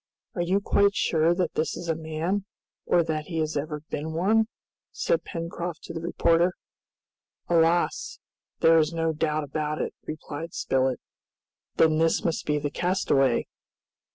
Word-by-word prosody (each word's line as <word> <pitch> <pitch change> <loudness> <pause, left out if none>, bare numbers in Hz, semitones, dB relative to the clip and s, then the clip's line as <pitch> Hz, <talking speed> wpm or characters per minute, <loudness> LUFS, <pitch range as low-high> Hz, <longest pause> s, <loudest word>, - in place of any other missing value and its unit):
"Are 175 - -2
you 185 +3 +2
quite 200 0 +3
sure 165 +1 +2
that 175 -3 -1
this 155 - -1
is 175 - -6
a 165 - +2
man, 160 +5 -2 0.4
or 170 - +4
that 155 -2 -2
he 165 -1 -5
has 155 -1 -1
ever 150 +1 -3
been 155 +2 -3
one?" 215 +7 +3 0.4
said - - 0
Pencroft 170 0 -5
to - - -7
the 165 - -4
reporter. 170 +1 +2 0.9
"Alas! 170 0 +2 0.4
there 165 0 +6
is 155 0 +2
no 165 -1 0
doubt 155 0 0
about 150 +1 -3
it," - - -2
replied 155 +2 -6
Spilett. 130 -2 +1 0.8
"Then 155 -1 +4
this 165 0 +2
must 165 -2 -1
be 150 0 +2
the 145 0 -2
castaway?" 140 -8 +2
165 Hz, 155 wpm, -26 LUFS, 155-175 Hz, 0.9 s, there